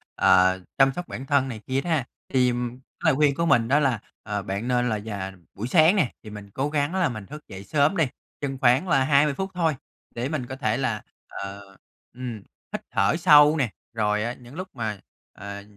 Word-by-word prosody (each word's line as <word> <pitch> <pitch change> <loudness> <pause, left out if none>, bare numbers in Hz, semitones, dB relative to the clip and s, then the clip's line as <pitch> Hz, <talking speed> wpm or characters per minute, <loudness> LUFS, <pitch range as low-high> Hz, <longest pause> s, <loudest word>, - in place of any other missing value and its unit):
ờ, 95 0 +5 0.2
chăm 135 -1 +5
sóc 175 0 -6
bản 130 - -6
thân 140 -1 +2
này 115 -4 -6
kia 135 +1 0
đó 175 - -5
ha. 150 -6 +1 0.2
Thì 125 -2 +3
cái 125 +2 -6
lời 155 -4 +5
khuyên 145 -1 +3
của 170 +3 0
mình 115 -7 +4
đó 140 +3 +4
là, 130 -7 +1 0.2
ờ, 105 -1 -3
bạn 100 +5 -4
nên 125 -1 +1
là 110 - -1
dà 100 -3 -5 0.2
buổi 105 +4 -4
sáng 160 +7 +5
nè, 160 - +2
thì 110 - -9
mình 105 -1 -9
cố 140 +6 -1
gắng 150 +3 0
là 180 -6 +2
mình 110 -4 -6
thức 150 +5 -11
dậy 95 -1 -9
sớm 145 - +2
đi, 165 - +4 0.4
chừng 135 -2 -3
khoảng 130 +8 +4
là 135 -5 +3
20 140 +1 +4
phút 190 +5 -4
thôi 165 -3 +1 0.4
để 120 +3 -2
mình 145 -5 -2
có 130 - -6
thể 120 -4 0
là, 115 -6 -1 0.3
ờ, 100 +1 -7 0.5
ừm, 125 -2 -5 0.4
hít - - -3
thở - - +2
sâu 150 -2 +7
nè. 130 -6 +1 0.2
Rồi 105 -1 +1
á 120 +2 -2
những 125 +2 -14
lúc 185 +2 -5
mà, 110 -5 -3 0.3
ờ, 100 0 -8
130 Hz, 220 wpm, -25 LUFS, 110-150 Hz, 0.5 s, sâu